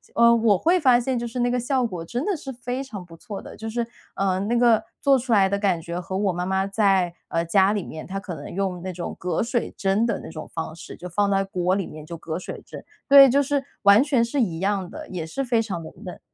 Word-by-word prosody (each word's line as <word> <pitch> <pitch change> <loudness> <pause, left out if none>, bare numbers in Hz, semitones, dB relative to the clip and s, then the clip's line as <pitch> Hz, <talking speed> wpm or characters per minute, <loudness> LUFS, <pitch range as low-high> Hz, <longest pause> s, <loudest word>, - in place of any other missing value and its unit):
呃， 235 0 +6
我 220 -4 +4
会 355 - +3
发 255 -5 +5
现 250 0 -1
就 235 - -3
是 245 +2 -5
那 245 0 +2
个 250 - +1
效 255 0 0
果 180 -7 -4
真 245 - -3
的 405 -3 0
是 270 -2 -7
非 245 +2 -4
常 200 -9 -8
不 165 -1 -13
错 210 -1 -7
的。 - - -11
就 225 0 -5
是， 235 +1 -1 0.3
呃， 190 -1 0
那 235 +4 0
个 230 -2 +4 0.2
做 275 -1 +5
出 245 0 -5
来 195 -3 +5
的 200 +1 0
感 190 -5 +1
觉 170 +2 -5
和 190 +2 -4
我 195 -3 +1
妈 180 +1 -2
妈 190 +1 0
在， 195 -4 +2 0.2
呃， 165 0 0
家 190 +3 +4
里 205 -4 -2
面， 155 - -8
她 195 +1 -4
可 190 -3 -7
能 145 - -8
用 185 -2 -2
那 185 0 -4
种 175 0 -6
隔 175 -2 -1
水 240 0 -1
蒸 200 +3 +1
的 230 - -1
那 - - -8
种 155 - -8
方 160 -1 -4
式， - - -10
就 180 - -7
放 200 +4 +1
在 195 0 +2
锅 185 -1 0
里 195 -2 -1
面， 155 0 -10
就 170 +1 -7
隔 160 0 -5
水 - - -7
蒸， - - -10 0.2
对， 275 -1 +9
就 280 +3 +4
是 280 0 0 0.2
完 200 +4 +7
全 270 -5 +2
是 265 +3 -1
一 170 -7 -1
样 195 -2 -1
的， - - -9
也 175 -4 -4
是 270 +12 -3
非 235 -2 +2
常 185 -7 -4
的 - - -9
嫩。 180 -3 -8
200 Hz, 285 characters per minute, -24 LUFS, 180-240 Hz, 0.3 s, 对